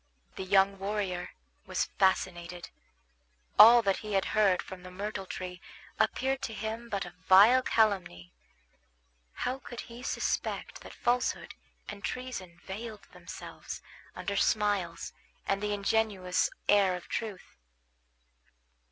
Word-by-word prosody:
The - - -5
young 195 +1 +3
warrior 195 -3 -2 0.4
was - - 0
fascinated. 180 -2 0 0.9
All 235 +1 +10
that 195 -2 +2
he 215 -1 -6
had 195 -1 +2
heard 200 -4 +3
from 185 -1 -9
the 185 - -10
myrtle 195 +1 -5
tree 180 0 -6 0.4
appeared 270 +1 +1
to 225 - -4
him 225 +2 -5
but 200 -3 -2
a 175 - -9 0.2
vile 210 +7 +8
calumny. 190 - 0 1.1
How 255 +2 -1
could 240 -2 -8
he 235 +1 -11
suspect 260 - -2
that - - -11
falsehood 245 +1 0 0.3
and 205 -1 -8
treason 250 -9 -5
veiled 215 +2 -7
themselves - - -9 0.3
under 200 - -3
smiles 205 -4 0 0.3
and 195 0 0
the 210 0 -1
ingenuous 200 -3 +1 0.2
air 200 -3 +4
of 180 - -9
truth? 210 - -5
200 Hz, 125 wpm, -30 LUFS, 185-220 Hz, 1.1 s, All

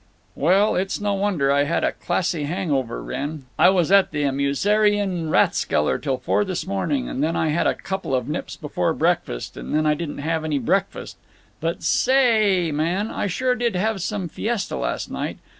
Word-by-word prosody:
"Well, 190 +8 +3
it's 190 +1 -1
no 205 -1 0
wonder 195 -9 +1
I 140 +1 +3
had 155 - 0
a - - +2
classy 170 -5 -1
hang 175 +2 -2
over, 130 -4 -1
Wrenn. 140 +2 -5
I - - +7
was 180 -2 +2
at 200 -1 +5
the 145 -1 -2
Amusieren 180 +6 +1
Rathskeller 75 - +2
till 135 -3 -1
four 125 +10 +1
this 185 -3 -3
morning, 195 +8 -1
and 135 - -2
then 160 +2 0
I 160 - +1
had 155 +3 +1
a - - +1
couple 190 -8 -3
of 125 -2 -1
nips - - -4
before - - -1
breakfast, - - -1
and - - -4
then 155 0 +2
I 150 - +4
didn't 150 0 -5
have 160 +2 -2
any 155 -2 0
breakfast. 130 - -1 0.4
But 165 +1 -3
sa 260 - +2
a - - +5
a 215 -9 +3
ay, - - -3
man, 170 +8 -1
I - - -2
sure 250 +7 0
did 240 -4 -1
have 205 +1 0
some 190 0 -2
fiesta 215 +5 -3
last - - -3
night. - - -4
175 Hz, 200 wpm, -22 LUFS, 150-205 Hz, 0.4 s, I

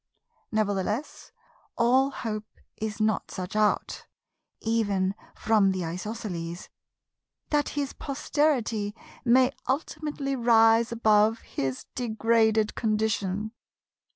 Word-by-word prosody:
Nevertheless, 210 +4 -2 0.5
all 255 +3 +4
hope 215 -5 -5 0.3
is 215 0 -4
not 215 -1 0
such 185 +2 -6
out, 215 -1 0 0.5
even 205 -4 0 0.2
from 215 -3 +3
the 185 -2 -2
Isosceles, 175 -1 -5 0.8
that 295 -1 +2
his 280 -1 -1
posterity 260 -7 0 0.3
may 255 +1 +5 0.2
ultimately 280 0 -2
rise 230 -1 +4
above 220 -1 +3
his 135 +1 -4
degraded 220 -2 +2
condition. 215 -2 -1
220 Hz, 90 wpm, -27 LUFS, 205-235 Hz, 0.8 s, may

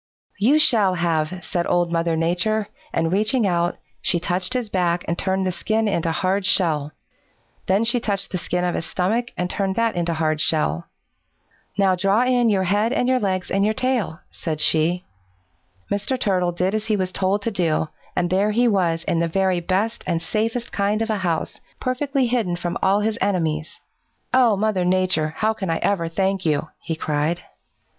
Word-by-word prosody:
"'You 255 +9 +4
shall 215 -11 +4
have,' 170 +1 -1
said 175 -2 -1
Old 175 -1 +1
Mother 165 -1 +1
Nature, 180 +6 0 0.2
and 165 +1 0
reaching 215 +4 +2
out, 175 -1 0 0.2
she 175 - +1
touched 180 +6 -1
his 250 -3 -1
back 175 -3 0
and 170 - 0
turned 190 +1 0
the 185 - +1
skin 220 +5 0
into 170 -5 0
hard 190 +4 0
shell. 155 -6 +2 0.8
Then 195 +4 +3
she 240 +2 +2
touched 200 -4 -3
the 185 - -2
skin 180 +1 -2
of 175 -1 0
his - - -2
stomach 225 +7 0
and 180 - -1
turned 190 +1 -1
that 230 0 +1
into 170 -1 -1
hard 155 -1 0
shell. 85 - 0 0.9
'Now 195 -2 +4
draw 195 +5 +2
in 250 -2 +3
your 195 -3 +2
head 205 +5 +1
and 250 - +1
your 255 0 +3
legs 185 -3 -2
and 195 +1 +2
your 215 +1 +1
tail,' 235 -11 -1
said 155 -3 -4
she. 165 +4 +2 0.9
"Mr. 205 +6 -1
Turtle 185 -6 +1
did 180 +3 -1
as 215 0 -2
he 215 - +2
was 185 -2 -1
told 195 +2 0
to 230 - -1
do, 165 -5 0 0.3
and 175 0 0
there 195 +3 +2
he 240 +3 +2
was 175 -6 +1
in 165 - 0
the 170 - +1
very 185 +1 +1
best 195 +6 -1
and 170 -2 +1
safest 225 +7 -2
kind 205 +2 0
of 225 - -2
a 215 - 0
house, 170 -4 -2 0.2
perfectly 265 +1 0
hidden 230 -7 0
from 175 0 -3
all 200 +2 +3
his 220 +1 -1
enemies! 160 -5 -1 0.5
"'Oh, 245 -5 +4
Mother 210 -3 +1
Nature, 180 -4 +1
how 220 +1 +1
can 195 -5 -4
I 165 - +1
ever 185 -5 +1
thank 190 +3 -1
you?' 155 -1 0
he 165 - -4
cried. 155 +2 -1
185 Hz, 190 wpm, -22 LUFS, 170-215 Hz, 0.9 s, You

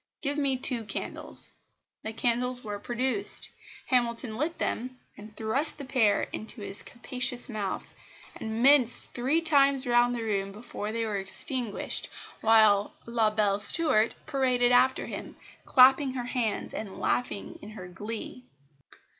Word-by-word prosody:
"Give 290 +1 -2
me 275 -2 0
two 250 -2 +3
candles." 210 - -5 0.5
The 220 - -4
candles 245 +2 -2
were 205 -2 -6
produced. 255 - +2 0.3
Hamilton 235 -2 -1
lit 305 +7 -3
them, 255 +2 -3 0.2
and 210 0 -14
thrust 260 +9 -2
the 285 - -8
pair 230 -5 +1
into 220 +1 -7
his 200 0 -1
capacious 250 +1 -2
mouth, 210 -6 -5 0.4
and 220 +1 -4
minced 270 -3 +6
three 270 +7 0
times 280 -4 +3
round 245 0 +2
the 235 - -4
room 195 -3 -2
before 215 -1 -7
they 230 0 -2
were 210 -2 -3
extinguished, 200 +4 -2 0.3
while 215 -2 +4
La 230 -2 +1
belle 210 -2 0
Stuart 225 -2 +5
paraded 255 -4 +1
after 260 +1 +3
him, - - -8 0.3
clapping 265 +1 +5
her 245 -2 -4
hands 240 -4 -2
and 200 -3 -7
laughing 245 -4 -2
in 205 - -10
her 195 -4 -10
glee. 215 +6 -8
240 Hz, 140 wpm, -27 LUFS, 215-260 Hz, 0.5 s, minced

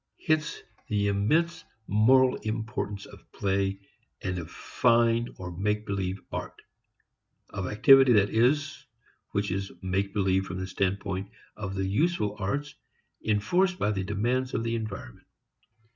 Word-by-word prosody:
Hence 155 -1 0 0.2
the 100 -1 +1
immense 155 +13 +1 0.2
moral 125 +6 +4
importance 110 -2 -4
of - - -16
play 95 0 -1 0.4
and 90 -1 -2
of 80 -1 -7
fine, 115 0 +2
or 90 -1 -7
make 105 +3 -1
believe, 95 -1 -2
art - - -5 0.9
of 95 -1 -4
activity, 135 +5 +6
that 105 -2 +4
is, 145 +6 +1 0.4
which 100 -1 -1
is 95 +1 -3
make 95 +1 -1
believe 95 -1 +1
from 90 - -5
the 95 - -3
standpoint 95 +1 -2 0.3
of 95 -2 -5
the 95 0 -1
useful 105 - +1
arts 140 +9 -2 0.5
enforced 175 - +2
by 105 - +1
the 95 -2 -2
demands 120 +6 -1
of 115 - 0
the 115 0 -1
environment. 100 - -6
105 Hz, 135 wpm, -28 LUFS, 95-120 Hz, 0.9 s, activity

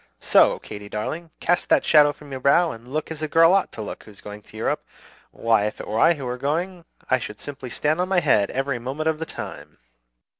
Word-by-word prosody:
"So, - - +4
Katy 105 0 -10
darling, 160 +11 -4
cast 175 +1 0
that - - +4
shadow 150 -2 +6
from 145 0 -14
your 130 - -4
brow, 165 +5 +4
and 115 -1 -11
look 155 +2 -3
as 155 -1 -6
a 155 - -1
girl 165 +3 +5
ought 195 - +2
to 110 - -6
look - - -7
who's 105 -2 -15
going 105 0 -9
to 110 - -15
Europe. 110 - -1 0.5
Why, 115 -3 +1
if 105 - -6
it - - -7
were 110 +2 -1
I 165 +7 +5
who 140 -3 -7
were 125 0 -4
going, 170 +5 -2 0.3
I 130 - +4
should 105 -2 -7
simply 135 -3 -8
stand 155 +7 0
on 185 - -1
my 190 -2 +3
head 100 - +2
every 135 -1 -2
moment 140 +6 -2
of 155 -1 -2
the 160 - -4
time!" - - -8
140 Hz, 235 wpm, -23 LUFS, 115-160 Hz, 0.5 s, shadow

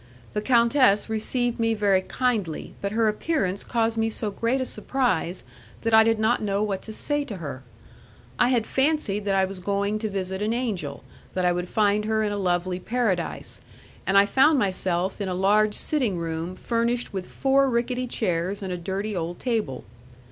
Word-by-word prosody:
The 210 - -1
countess 235 -2 +4
received 240 +2 -1
me 225 0 +2
very 200 -3 +3
kindly, 210 -6 -2
but 200 - -2
her 225 0 +2
appearance 210 - -1
caused 230 -1 0
me 225 0 +2
so 215 -1 -3
great 230 +6 0
a 260 - -1
surprise 190 - -1 0.4
that 230 -1 -1
I 220 0 +8
did 225 0 +2
not 220 +3 +2
know 200 -1 0
what 200 -3 -2
to 220 - -7
say 290 +6 -1
to 215 -8 -6
her. 140 -6 -6 0.8
I 245 - +5
had 240 -4 +2
fancied 265 -8 0
that 195 -1 +1
I 190 0 +4
was 190 0 -7
going 200 +2 -1
to 215 0 -2
visit 190 -1 -3
an 215 +2 0
angel, 200 - -3 0.3
that 185 -1 +1
I 180 - +4
would 180 0 -2
find 210 0 +2
her 220 0 +1
in 210 - 0
a 205 - -2
lovely 180 -1 0
paradise, 215 -5 -1 0.5
and 195 - +4
I 200 - +7
found 270 +8 +4
myself 185 -3 0
in 195 - -2
a 180 - -2
large 210 +3 +3
sitting 250 - 0
room 165 +1 -3
furnished 235 +2 -1
with 190 -2 -4
four 275 0 +2
rickety 250 +1 -1
chairs 190 -3 -1
and 185 -1 -3
a - - -3
dirty 195 +4 -3
old 170 0 -3
table. 220 - -2
210 Hz, 190 wpm, -25 LUFS, 185-235 Hz, 0.8 s, I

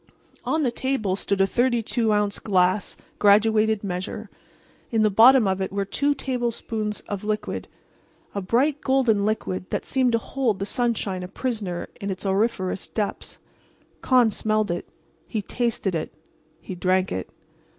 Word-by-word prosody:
On 315 -1 +1
the 250 - +1
table 240 -6 -1
stood 200 0 -1
a - - +6
32 235 0 +1
ounce 210 -1 +1
glass 185 0 +1 0.2
graduated 215 +1 +4
measure. 195 +3 -5 0.6
In 225 -2 +2
the 215 - +3
bottom 230 +2 +7
of 190 0 0
it 190 - -2
were 200 0 -1
two 285 +8 0
tablespoonfuls 235 -5 -3
of 205 -1 -6
liquid—a 210 -1 -6
bright 265 +9 +1
golden 250 -7 +2
liquid 185 -4 -2
that - - -2
seemed 255 -2 +1
to - - +5
hold 230 -2 -1
the 195 - -3
sunshine 215 -5 -1
a 180 - -5
prisoner 200 -4 -3
in 200 - -3
its 190 0 -5
auriferous 195 -1 0
depths. 210 -2 -4 0.6
Con 250 -4 +4
smelled 215 -2 0
it. 175 - -4 0.4
He 215 -3 -3
tasted 230 -4 -1
it. 160 - -3 0.5
He - - -7
drank 185 +1 +1
it. 95 - -3
215 Hz, 150 wpm, -24 LUFS, 195-240 Hz, 0.6 s, bottom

